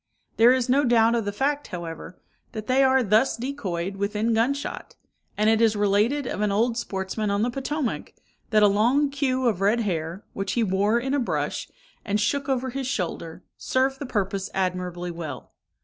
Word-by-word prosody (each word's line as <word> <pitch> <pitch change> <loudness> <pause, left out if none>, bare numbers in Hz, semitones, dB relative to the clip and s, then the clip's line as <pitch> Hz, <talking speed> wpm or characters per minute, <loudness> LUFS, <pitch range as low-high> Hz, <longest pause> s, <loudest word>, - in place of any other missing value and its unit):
There 230 +2 +7
is 255 -2 +1
no 270 +3 +3
doubt 230 -2 +4
of 230 -3 0
the 205 - -1
fact, 285 +7 -1
however, 170 0 -7 0.3
that 215 -1 -5
they 260 +3 +3
are 265 -1 +4
thus 220 +5 +3
decoyed 195 -8 -4
within 210 +3 0
gun 230 +5 +2
shot; 285 - -7 0.4
and 210 +1 +2
it 220 0 +4
is 225 -2 +4
related 210 +7 +2
of 210 - -3
an 210 -1 +1
old 225 +4 +1
sportsman 200 -1 -3
on 200 +1 +1
the 245 - 0
Potomac, 270 0 -3 0.4
that 215 -2 +4
a - - +8
long 245 +8 +2
queue 260 -2 0
of 210 -5 0
red 215 +4 +3
hair, 170 -2 -3
which 195 0 -3
he 235 - +1
wore 205 +3 +2
in 265 +3 -2
a 285 - +2
brush, 245 - -2 0.3
and 210 -1 0
shook 275 +6 0
over 260 -1 0
his 270 0 -3
shoulder, 180 -7 -4
served 270 +1 0
the 280 - -5
purpose 195 -4 -2
admirably 180 -2 -2
well. 165 -3 -7
220 Hz, 190 wpm, -25 LUFS, 195-260 Hz, 0.4 s, a